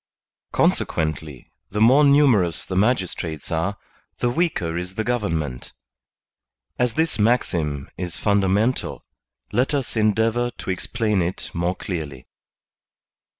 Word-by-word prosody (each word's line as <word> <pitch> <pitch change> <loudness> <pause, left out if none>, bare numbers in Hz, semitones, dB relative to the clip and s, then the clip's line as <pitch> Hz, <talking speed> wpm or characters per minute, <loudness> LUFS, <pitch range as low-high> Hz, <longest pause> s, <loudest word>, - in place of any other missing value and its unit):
Consequently, 80 -4 0 0.2
the 105 - -3
more 130 +7 +6
numerous 135 - +4
the 95 - -4
magistrates 90 - 0
are, 85 +5 -1 0.4
the 120 - 0
weaker 120 - 0
is 90 +2 -4
the 110 - -1
government. 85 - -2 1.1
As 125 -1 +1
this 160 -8 0
maxim 85 - +1
is 90 -2 -4
funda 100 -2 +2
mental, 110 +7 0 0.5
let 125 +6 +1
us 135 -4 -2
endeavor 110 +2 +2
to - - -3
explain 105 +1 0
it 85 +2 -3
more 85 +2 -1
clearly. 75 -10 -5
100 Hz, 115 wpm, -23 LUFS, 85-120 Hz, 1.1 s, more